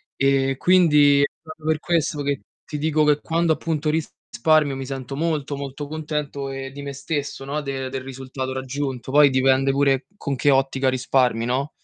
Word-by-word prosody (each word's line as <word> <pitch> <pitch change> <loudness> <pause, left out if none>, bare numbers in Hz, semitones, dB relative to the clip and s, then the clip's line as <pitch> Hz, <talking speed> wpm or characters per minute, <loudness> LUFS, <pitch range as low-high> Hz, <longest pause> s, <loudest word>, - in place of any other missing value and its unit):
Ehm, 135 -1 +2
quindi 150 -5 +5
è - - +5
proprio 160 -1 -12
per 160 -1 +2
questo 155 -3 0
che 140 -4 -1 0.2
ti 150 - -5
dico 155 0 +2
che 150 -1 +3
quando 165 0 +1
appunto 155 -1 -1
risparmio 155 -1 0
mi 135 0 -5
sento 135 -1 -5
molto, 150 -2 -1
molto 140 +1 -6
contento, 150 -2 -4
ehm, 135 0 -6
di 140 - -8
me 140 0 -6
stesso, 145 -1 -4
no, 150 +2 -2
de 135 -2 -4
del 130 0 -4
risultato 130 0 -6
raggiunto. 130 -1 -4
Poi 145 0 +7
dipende 130 +1 +3
pure 135 -1 +2
con 140 - -3
che 145 - +2
ottica 135 -1 +2
risparmi, 125 -2 +1
no? 135 +4 -1
140 Hz, 175 wpm, -23 LUFS, 135-150 Hz, 0.2 s, Poi